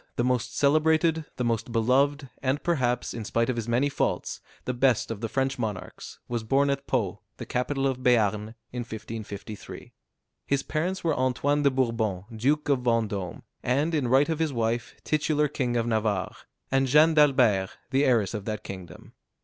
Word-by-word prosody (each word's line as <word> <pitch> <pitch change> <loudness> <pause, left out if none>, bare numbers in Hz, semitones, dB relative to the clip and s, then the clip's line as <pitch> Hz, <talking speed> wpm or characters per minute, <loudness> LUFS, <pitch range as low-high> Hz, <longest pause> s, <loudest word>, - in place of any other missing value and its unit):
the 120 - 0
most 125 0 0
celebrated, 160 +2 +3
the 125 - -1
most 115 0 -1
beloved, 135 +5 +2
and 135 +2 0
perhaps, 125 -8 0
in 115 - -5
spite 115 +3 0
of - - -4
his 115 -1 -3
many 120 +4 +2
faults, 140 - -2 0.2
the 125 - -1
best 125 -2 +2
of 110 -2 -5
the 115 - -2
French 135 +1 -1
monarchs, 105 -6 -5
was 120 -2 -2
born 140 +5 +2
at 140 0 -3
Pau, 110 -9 -1 0.2
the - - -6
capital 135 +2 -1
of 130 -2 0
Béarn, 110 -3 +2 0.2
in 125 - -5
1553. 110 -3 -7 0.5
His 140 -1 +1
parents 180 +5 -2
were 160 -3 +1
Antoine 130 +3 +1
de 140 - +5
Bourbon, 115 -8 0
Duke 145 +7 +1
of 140 -3 +3
Vendôme, 110 -7 -1 0.2
and 145 +7 +1
in 145 -5 +1
right 135 +4 +4
of 160 -1 -1
his 160 -2 +1
wife, 115 -1 -1
titular 150 0 +1
king 125 -4 -1
of 115 - +1
Navarre, 110 -5 0 0.4
and 135 0 +3
Jeanne 150 +5 +6
d'Albert, 130 -11 +4 0.2
the 135 +1 +3
heiress 115 -8 +2
of 105 -2 -4
that 110 -2 -4
kingdom. 95 -3 -10
125 Hz, 175 wpm, -27 LUFS, 115-140 Hz, 0.5 s, Jeanne